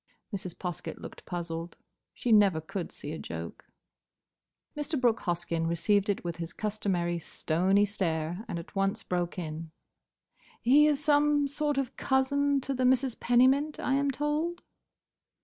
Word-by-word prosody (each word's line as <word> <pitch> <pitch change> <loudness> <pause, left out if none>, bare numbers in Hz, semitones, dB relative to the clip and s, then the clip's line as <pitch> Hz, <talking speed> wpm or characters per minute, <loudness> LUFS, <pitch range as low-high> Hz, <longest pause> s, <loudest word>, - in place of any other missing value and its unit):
Mrs. 185 -3 -6
Poskett 175 -3 -5
looked - - -10
puzzled. 170 -1 -5 0.3
She 245 - -2
never 200 -6 +5
could 175 +3 -5
see 145 - -7
a 160 - -5
joke. 80 0 -7 1.1
Mr. 295 0 -2
Brooke 240 -3 +3
Hoskyn 170 -1 -1
received 195 +5 +2
it 200 - 0
with 170 -1 -4
his 165 0 -5
customary 190 -5 -1
stony 185 +6 +1
stare 175 -2 -2
and - - -3
at 170 +4 -9
once 195 0 0
broke 175 0 -2
in. 160 -1 -5 0.9
"He 285 +6 +6
is 295 -1 +1
some 290 -1 +3
sort 290 0 -1
of 270 -1 -2
cousin 280 +1 +2
to 275 - -3
the 255 -1 -1
Misses 255 0 +3
Pennymint, 265 +6 +3
I 265 - 0
am 280 +1 +2
told?" 300 +5 -1
205 Hz, 150 wpm, -29 LUFS, 170-275 Hz, 1.1 s, He